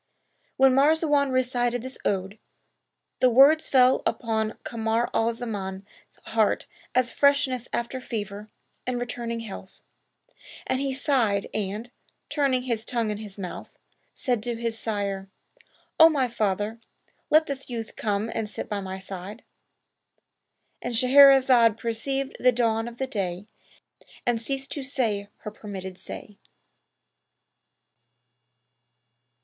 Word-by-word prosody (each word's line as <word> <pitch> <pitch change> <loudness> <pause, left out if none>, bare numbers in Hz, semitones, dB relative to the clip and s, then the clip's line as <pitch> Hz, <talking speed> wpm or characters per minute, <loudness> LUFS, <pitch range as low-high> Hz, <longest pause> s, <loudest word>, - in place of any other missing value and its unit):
When 265 0 +6
Marzawan 290 0 +3
recited 245 -2 0
this 260 +1 -6
ode, 195 +1 -2 0.8
the 255 - +5
words 275 +6 +6
fell 255 -1 +5
upon 220 -2 -1
Kamar 225 0 -1
al 225 +1 +2
Zaman's 200 -5 -5 0.4
heart 220 -2 +1 0.3
as 255 -2 +2
freshness 280 -3 +2
after 235 +2 -3
fever 210 -3 -5 0.4
and 250 -1 -1
returning 235 -1 -4
health; 195 -3 -9 0.9
and 260 - 0
he 275 0 -1
sighed 250 -7 0
and, 215 +3 -3 0.4
turning 270 -4 +1
his 230 -3 -2
tongue 230 -3 -1
in 210 - -4
his 210 -2 -9
mouth, 185 -3 -7 0.4
said 245 -5 -1
to 240 +1 -3
his 230 -1 -3
sire, 200 -3 -3 0.7
"O 320 0 +10
my 275 -5 +1
father, 215 -1 -1 0.5
let 310 +1 +5
this 275 -2 -6
youth 230 -2 -5
come 210 0 -1
and 215 -2 -3
sit - - -6
by 205 -1 -2
my 190 0 -5
side."—And 195 +4 -12
Shahrazad 255 -3 +6
perceived 265 +4 -2
the 250 - +5
dawn 230 -2 0
of 235 0 -9
day 185 -2 -3 0.8
and 240 -2 +1
ceased 270 +2 -4
to 290 - -4
say 230 -7 -1
her 210 - -6
permitted 190 -3 -7
say. 205 - -9
235 Hz, 120 wpm, -26 LUFS, 210-260 Hz, 0.9 s, O